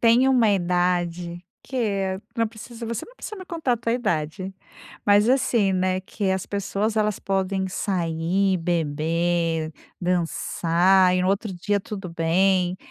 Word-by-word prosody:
Tem 240 +3 +5
uma 245 -5 +4
idade 175 -1 0 0.2
que 200 -7 -1 0.2
não 230 - +2
precisa 230 +2 -9
você 230 -1 -4
não - - -17
precisa 430 - -7
me 375 - -8
contar 325 -8 -1
a - - +2
tua 230 0 -1
idade, 190 -4 -2 0.5
mas, 205 +2 +5
assim, 230 -7 +2
né, 185 0 +1
que 195 0 -2
as 190 -1 -1
pessoas 200 +2 -1
elas 210 -2 +1
podem 190 0 -1
sair, 185 0 0
beber, 165 0 0 0.3
dançar 180 +1 +2
e 180 - +1
no 185 - +1
outro 200 +1 0
dia, 200 +3 0
tudo 195 -1 -6
bem. 180 +2 +2
190 Hz, 145 wpm, -24 LUFS, 175-210 Hz, 0.5 s, Tem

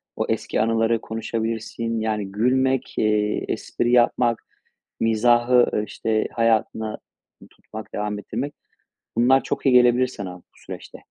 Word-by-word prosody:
o - - -1
eski - - -1
anıları 115 0 +1
konuşabilirsin. 115 0 -3
Yani, 105 -3 -2
gülmek, 130 +5 +1
eee, 105 -1 +1
espri 120 - -2
yapmak, 120 -1 +3 0.6
mizahı, 120 +1 +3
işte, 110 -1 -1
hayatına 110 -1 0 0.5
tutmak, 110 0 -11
devam 105 0 -3
ettirmek; 130 +8 -4 0.6
bunlar 130 +3 +4
çok - - -4
iyi 135 - +5
gelebilir 125 +1 +5
sana 95 -7 -7
bu - - -22
süreçte. - - -10
115 Hz, 120 wpm, -23 LUFS, 110-120 Hz, 0.6 s, iyi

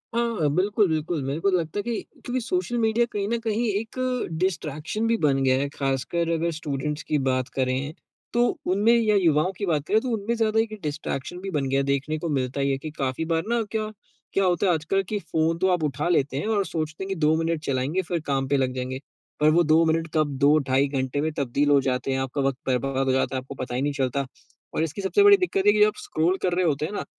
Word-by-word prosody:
हाँ, 230 -11 +1
बिल्कुल, 205 +2 +2
बिल्कुल। 160 0 -1
मेरे 135 +4 -2
को 195 - +2
तो 185 - +3
लगता 165 +3 -3
है 205 - -2
कि 235 -2 -2 0.2
क्योंकि 250 +1 -2
सोशल 300 -3 -1
मीडिया 225 +1 +2
कहीं 200 -1 -2
न 235 - +1
कहीं 230 +1 -1
एक 215 +2 -3 0.4
डिस्ट्रैक्शन 180 +3 -2
भी 230 0 +2
बन 145 -7 +2
गया 130 -1 +4
है, 140 - 0
खासकर 140 +5 -1
अगर 165 +1 0
स्टूडेंट्स 150 -1 -3
की 150 - 0
बात 130 -1 +1
करें, 130 +3 -1 0.4
तो 240 0 +3 0.3
उनमें 210 +5 +4
या 220 -3 +3
युवाओं 170 -2 +3
की 200 - -2
बात 155 -4 0
करें, 215 - +4
तो 255 - -3
उनमें 220 +1 -1
ज़्यादा 220 -1 +1
एक 225 -1 0
डिस्ट्रैक्शन 150 +2 -4
भी 195 - -5
बन 145 -5 -1
गया 135 +1 +2
है। 140 - +1
देखने 140 +3 -1
को 170 - -3
मिलता 130 -1 -1
ही 140 0 +1
है 135 - 0
कि 155 +3 -7
काफ़ी 135 +3 -1
बार 165 0 0
ना 235 -1 +2
क्या, 215 -1 -2 0.4
क्या 195 - +2
होता 180 +1 +2
है 180 - +4
आजकल 170 +5 0
कि 210 - 0
फ़ोन 165 -2 0
तो 190 - +1
आप 165 - -5
उठा 150 +3 -1
लेते 140 -5 +1
हैं 180 - -2
और 205 -3 +1
सोचते 155 +2 -4
हैं - - -5
कि 195 - -1
2 155 +1 +4
मिनट 165 -2 -1
चलाएँगे, 140 +7 0
फिर 175 -1 -2
काम 135 -1 0
पे 140 +1 +2
लग 130 -1 0
जाएँगे। 130 +1 -3 0.4
पर 150 +1 +5
वो 170 +2 +4
2 160 +1 +4
मिनट 165 0 +1
कब 145 -3 0
2, 145 +2 +5
ढाई 135 +1 +1
घंटे 135 0 -2
में 160 +1 0
तब्दील 140 +2 +1
हो 145 -1 +6
जाते 130 0 -1
हैं, 130 - 0
आपका 135 +2 -2
वक़्त 135 -1 0
बर्बाद 135 +1 0
हो 130 - +2
जाता 130 0 0
है, 130 - -1
आपको 135 +2 -10
पता 125 -1 -5
ही 130 - -1
नहीं 145 0 0
चलता 135 0 -1 0.5
और 160 - +1
इसकी 165 +5 -4
सबसे 195 - +3
बड़ी 405 0 +8
दिक्कत 280 - 0
है 205 - +7
कि 210 - +1
जब 210 - +7
आप 210 - -2
स्क्रॉल 170 +4 0
कर 180 - +1
रहे 185 -1 +2
होते 150 -1 +1
हैं 160 - -5
ना, - - -3
160 Hz, 255 wpm, -25 LUFS, 140-200 Hz, 0.5 s, बड़ी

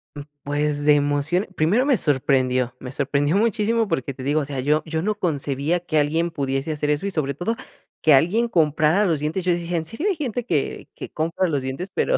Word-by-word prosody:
Mm, 145 - -6 0.2
pues 145 0 -1
de 150 - +7
emoción, 145 +6 0
primero 195 +12 +2
me 275 -4 +3
sorprendió, 130 -5 +1
me 125 - -7
sorprendió 145 +3 0
muchísimo, 225 0 +1
porque, 135 -5 -2
te 130 - -9
digo 145 +3 +1
o - - -3
sea 135 -2 -5
yo 150 +4 +2
yo 160 0 -2
no 210 +4 0
concebía 145 0 -1
que 170 -3 -1
alguien 165 +3 +1
pudiese 135 0 -2
hacer 150 -1 -2
eso 150 +6 0
y 200 - -1
sobre 140 -5 -1
todo 220 +10 -2 0.5
que 155 - +5
alguien 180 - +3
comprara 160 +1 +3
los 165 -5 +1
dientes. 155 +5 -2
Yo 180 -1 +2
dije: 170 0 -3
"¿En 165 -1 -1
serio 225 - -3
hay 380 - +1
gente 245 -6 -3
que 155 - -2
que - - -7
compra 165 +4 -1
los 145 -5 -1
dientes?" 135 +9 -5
Pero, - - +2
155 Hz, 215 wpm, -22 LUFS, 145-185 Hz, 0.5 s, de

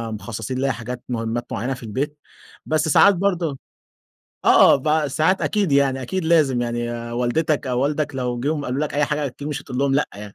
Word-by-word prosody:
مخصّصين 110 +4 -5
ليَّ 135 +1 +1
حاجات 120 +1 -7
مهمّات 115 0 -2
معيّنة 125 +7 -2
في 125 - -10
البيت، 140 +7 -3 0.5
بس 155 +1 0
ساعات 200 +6 +6
برضو 175 -6 -1 0.9
آه - - +7
ب 150 +2 +1
ساعات 160 +7 +1
أكيد 200 -7 0
يعني 135 -1 +2
أكيد 180 +7 -3
لازم 150 -7 +3
يعني 120 0 -2 0.2
والدتك 140 +5 0
أو 125 -1 0
والدك 145 +1 -1
لو 125 -2 -2
جم 145 +2 -1
قالوا 130 +3 -2
لك 150 - -2
أي 150 +1 +3
حاجة 150 0 -1
أكيد 140 +2 -7
مش 145 -1 -4
هتقول 125 - -6
لهم 140 0 +2
لأ 145 - +1
يعني، 105 0 -10
140 Hz, 190 wpm, -22 LUFS, 120-150 Hz, 0.9 s, آه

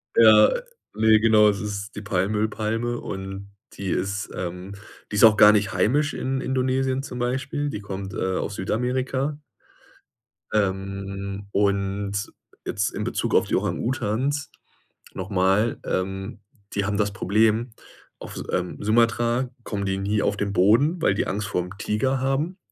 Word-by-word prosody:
Ja, 110 -2 +7 0.4
ne, 110 0 +5
genau, 110 -1 +5
das 100 - -1
ist 105 -1 -5
die 105 - -5
Palmöl-Palme 110 +4 -1
und 95 +1 -7 0.2
die 100 -1 -5
ist 100 +3 -2
ähm, 90 +2 -5 0.4
die - - -3
ist 100 - +4
auch 105 -2 +6
gar 105 0 +9
nicht 105 -3 +1
heimisch 140 +11 +2
in 130 0 -2
Indonesien 130 0 0
zum 125 -3 -7
Beispiel. 130 +4 -2
Die 105 -7 -5
kommt, 95 -1 -6
äh, 95 0 -1
aus 100 - -3
Südamerika. 130 +8 -1 1.2
Ähm, 100 0 -2
und 100 0 0 0.3
jetzt 100 +1 -1
in - - -3
Bezug - - -1
auf - - +4
die - - 0
Orang-Utans 130 +4 -1 0.7
noch 95 +2 -6
mal, 95 +4 +2
ähm, 95 +3 -3 0.3
die 100 - 0
haben 105 +1 -1
das 100 -1 +1
Problem, 110 +4 +2 0.5
auf - - -9
S - - -4
ähm, 90 0 -1
Sumatra 115 +3 +2 0.2
kommen 100 -2 -3
die 95 - 0
nie 105 +2 0
auf - - 0
den 100 -1 -2
Boden, 115 - +3
weil 130 - +3
die - - -1
Angst 105 +2 -2
vorm 90 0 -2
Tiger 130 +6 0
haben. 140 +8 -1
105 Hz, 150 wpm, -24 LUFS, 100-120 Hz, 1.2 s, gar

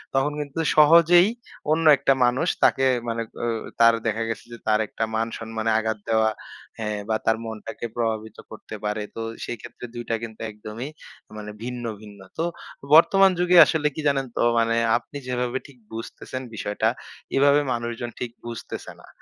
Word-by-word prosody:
তখন 135 +2 +2
কিন্তু 145 +2 -5 0.2
সহজেই 170 +4 +7 0.4
অন্য 165 +1 +2
একটা 135 - +3
মানুষ 120 +1 +1 0.2
তাকে, 135 - +4 0.2
মানে 115 0 -1 0.2
এ - - 0 0.3
তার, 115 0 +7
দেখা 110 +1 0
গেছে 110 - -5
যে - - -7
তার 110 0 +3
একটা - - -4
মান-সম্মানে 115 0 -2
আঘাত 110 -1 -1
দেওয়া 110 -1 +3 0.5
হ্যাঁ, 105 -1 -2
বা 110 - +2
তার 115 0 +3
মনটাকে 110 +1 -6
প্রভাবিত 110 -2 -2
করতে 110 0 -9
পারে, 105 0 -1
তো 115 - -4 0.2
সেক্ষেত্রে, 120 +1 -8
২ 120 - -5
টা 115 - +2
কিন্তু 110 -1 -8
একদমই, 110 +5 -7 0.5
মানে, 105 0 -7
ভিন্ন, 125 0 -5 0.2
ভিন্ন। 105 -2 -13 0.2
তো 165 - 0 0.5
বর্তমান 195 +4 +7
যুগে 180 0 +4
আসলে 150 -1 +1
কি - - -4
জানেন, 135 -1 +1
তো - - +1 0.2
মানে, 115 0 +2 0.2
আপনি 135 +4 -9
যেভাবে 125 0 -1
ঠিক 140 - -17 0.2
বুঝতেছেন 115 +3 -6
বিষয়টা, 105 +2 0 0.5
এভাবে 140 +1 +5
মানুষজন 120 0 -4
ঠিক 120 -2 -4
বুঝতেছে 115 -1 -7
না। - - -16
115 Hz, 160 wpm, -24 LUFS, 110-135 Hz, 0.5 s, সহজেই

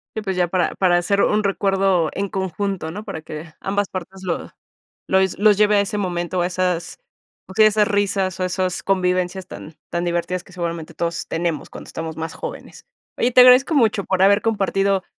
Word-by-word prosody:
Sí, 220 - -2
pues, 190 -3 -3
ya 180 -1 +2
para 180 +1 0
para 180 -2 +3
hacer 200 +3 +1
un 210 0 +2
recuerdo 195 -4 +1
en 200 -1 -3
conjunto, 190 -3 -3
¿no? 210 +4 -7
Para 195 -7 -6
que 155 +1 -8
ambas 200 0 -1
partes 185 +1 -7
lo 175 -2 -3 0.6
los 190 0 +1
los 210 0 +4
lleve 210 0 +4
a 200 - +5
ese 205 +1 -3
momento, 175 -1 -2
a 175 - +1
esas, 180 -2 -2 0.5
okey, 215 +3 +4
a - - +8
esas 210 0 +2
risas, 195 -3 0
o - - 0
a - - +1
esas 185 -1 -2
convivencias 185 -1 0
tan 155 -3 -10 0.2
tan 170 0 -2
divertidas 175 +1 -2
que, 190 - -19
seguramente, 170 -2 -4
todos 170 0 -3
tenemos 165 -3 -2
cuando - - -11
estamos 160 -1 -6
más 160 0 -4
jóvenes. 480 +1 -9 0.3
Oye, 245 +1 +1
te 250 - +8
agradezco 255 +5 +6
mucho 220 -7 +2
por 190 0 0
haber 200 +1 +5
compartido, 195 -3 0
190 Hz, 200 wpm, -21 LUFS, 175-200 Hz, 0.6 s, a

